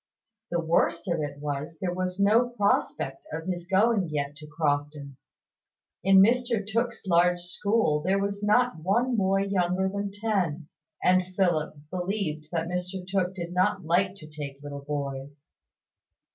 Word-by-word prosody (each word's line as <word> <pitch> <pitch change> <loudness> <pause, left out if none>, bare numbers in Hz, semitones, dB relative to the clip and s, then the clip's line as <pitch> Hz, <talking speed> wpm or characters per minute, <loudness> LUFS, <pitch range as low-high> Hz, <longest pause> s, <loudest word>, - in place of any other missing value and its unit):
The 170 - 0
worst 170 +1 +1
of 170 -2 0
it 145 -1 -4
was, 145 +2 -4
there 180 -2 -1
was 185 +1 -3
no 220 +5 +4
prospect 200 - 0
of 160 +1 -5
his 175 -2 -3
going 200 -1 +3
yet 145 -1 -2
to 150 0 -11
Crofton. 145 -2 -2 0.9
In 190 +1 +7
Mr 235 -1 +2
Tooke's 230 +1 -1
large 175 0 +3
school 180 -3 +1
there 190 +5 +1
was 200 0 -2
not 210 -2 +2
one 235 +9 +1
boy 195 -1 +2
younger 190 -1 +1
than 200 +1 -3
ten; 190 -7 -1 0.3
and 185 0 +4
Philip 175 -7 +1 0.2
believed 180 -4 -2
that 165 -1 -1
Mr 180 +1 -4
Tooke 190 -1 0
did 175 -1 -5
not 185 0 +1
like 185 +3 +2
to 165 -6 -12
take 145 -2 -8
little 140 -1 -6
boys. 140 0 -5
180 Hz, 150 wpm, -27 LUFS, 155-200 Hz, 0.9 s, In